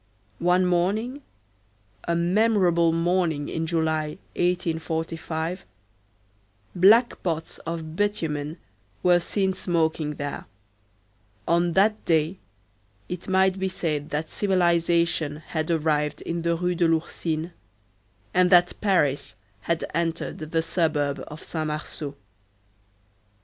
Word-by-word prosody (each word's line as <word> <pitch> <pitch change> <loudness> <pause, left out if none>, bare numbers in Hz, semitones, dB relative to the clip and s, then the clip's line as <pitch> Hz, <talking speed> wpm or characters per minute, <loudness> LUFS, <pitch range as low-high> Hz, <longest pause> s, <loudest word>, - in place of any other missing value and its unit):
One 180 +2 +3
morning,—a 170 - -3
memorable 175 -2 +3
morning 165 -3 0
in 160 0 -2
July, 160 -2 0 0.2
1845,—black 160 - -1
pots 165 -2 -3
of 165 -1 -4
bitumen 160 -6 -1 0.5
were 180 -1 +5
seen 190 +2 0
smoking 160 -4 0
there; 145 0 -5 1.0
on 170 0 +2
that 210 +4 +3
day 165 +3 +1 0.7
it 180 -1 -6
might 190 0 +3
be 190 0 0
said 155 -5 -2
that 155 +2 -3
civilization 170 -5 +2
had 155 +1 -4
arrived 150 -2 0
in 170 0 -3
the 170 0 +1
Rue 180 +1 0
de 170 -1 +2
l'Ourcine, 165 0 -1 0.8
and 180 0 +4
that 175 -1 +5
Paris 145 - +1 0.2
had 170 +9 -1
entered 165 0 -2
the 160 +1 -1
suburb 150 -5 0
of 150 +1 -9
Saint 160 -2 -3
Marceau. 150 -1 -5
165 Hz, 100 wpm, -25 LUFS, 150-180 Hz, 1.0 s, were